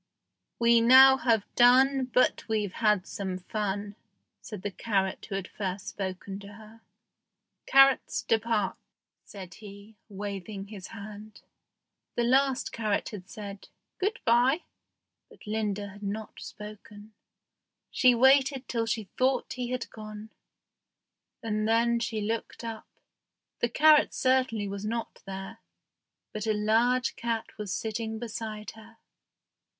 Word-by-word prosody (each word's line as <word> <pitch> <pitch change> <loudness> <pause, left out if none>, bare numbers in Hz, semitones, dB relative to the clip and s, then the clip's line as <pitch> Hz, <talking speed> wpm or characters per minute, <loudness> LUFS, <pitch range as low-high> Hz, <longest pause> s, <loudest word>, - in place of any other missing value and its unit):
"We 235 0 +5
now 260 +3 +8
have 225 -5 +2
done, 260 +2 +5
But 255 0 +1
we've 210 -4 -1
had 210 -4 +2
some 190 -2 -4
fun," 205 +1 -3 0.5
said 210 -4 -9
the 205 - -3
carrot 195 -2 -1
who 195 - -3
had 195 -1 -3
first 190 -1 -5
spoken 195 0 -5
to 200 0 -11
her. 220 +1 -15 0.9
"Carrots, 270 -1 +4
depart," 225 -2 0 0.5
said 190 -3 -10
he, 205 +1 -13
waving 200 0 -6
his 200 -4 -8
hand. 215 0 -10 0.7
The 240 - +1
last 265 +1 +2
carrot 215 -3 -1
had 190 -4 -9
said 200 -3 -8 0.3
"Good 405 +3 -1
by," 250 +7 +3 0.7
but 455 - -17
Linda 210 -1 -2
had 205 +1 -13
not 210 +1 -5
spoken. 210 0 -11 0.8
She 250 -2 +5
waited 265 +1 +4
till 230 -2 -1
she 225 -1 -1 0.2
thought 260 0 +1
he 250 -1 -4
had 250 -1 -3
gone, 215 0 -9 1.1
and 215 -1 -1
then 235 +1 +3
she 230 -2 -2
looked 225 +3 -4
up. 225 -1 -6 0.7
The 240 - +1
carrot 305 +4 +5
certainly 255 -5 +1
was 200 0 -5
not 230 +2 -4
there, 195 +3 -7 0.7
but 215 +1 -4
a 215 - +3
large 230 +4 +2
cat 230 -1 -3
was 210 -2 -4
sitting 220 0 -3
beside 220 -2 -6
her. 225 +1 -16
220 Hz, 130 wpm, -28 LUFS, 205-235 Hz, 1.1 s, now